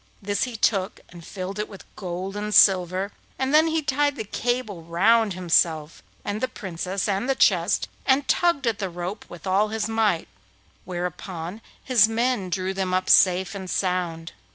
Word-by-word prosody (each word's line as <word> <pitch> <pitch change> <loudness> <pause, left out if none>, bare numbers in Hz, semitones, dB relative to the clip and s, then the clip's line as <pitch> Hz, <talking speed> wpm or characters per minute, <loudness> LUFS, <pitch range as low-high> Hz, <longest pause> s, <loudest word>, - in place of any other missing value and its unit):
This 205 +3 -1
he 250 -2 -7
took 195 -3 0
and 170 -1 -12
filled 190 +3 -6
it 210 - -3
with 195 - -12
gold 185 +1 -5
and 210 0 -2
silver, 185 +1 +4 0.3
and 265 +2 -1
then 310 +2 +6
he 320 -1 0
tied 285 0 +1
the 220 - -4
cable 220 -3 -2
round 200 +6 +2
himself 165 -3 +1 0.2
and 205 +1 -3
the 255 - +1
Princess 190 0 -4
and 200 +5 -1
the 270 - +2
chest, - - +2 0.2
and 275 +1 +2
tugged 340 -6 +2
at 225 -3 0
the 195 -2 -2
rope 175 +4 -6
with 175 -3 -11
all 195 +3 +2
his 215 0 -2
might, 220 -6 +1 0.6
whereupon 180 +1 -5 0.2
his 230 -5 +4
men 230 -4 0
drew 185 +1 -2
them 190 -1 -1
up 185 0 +1
safe 185 +1 +4
and 190 -2 -7
sound. 175 -4 -2
195 Hz, 175 wpm, -24 LUFS, 180-225 Hz, 0.6 s, then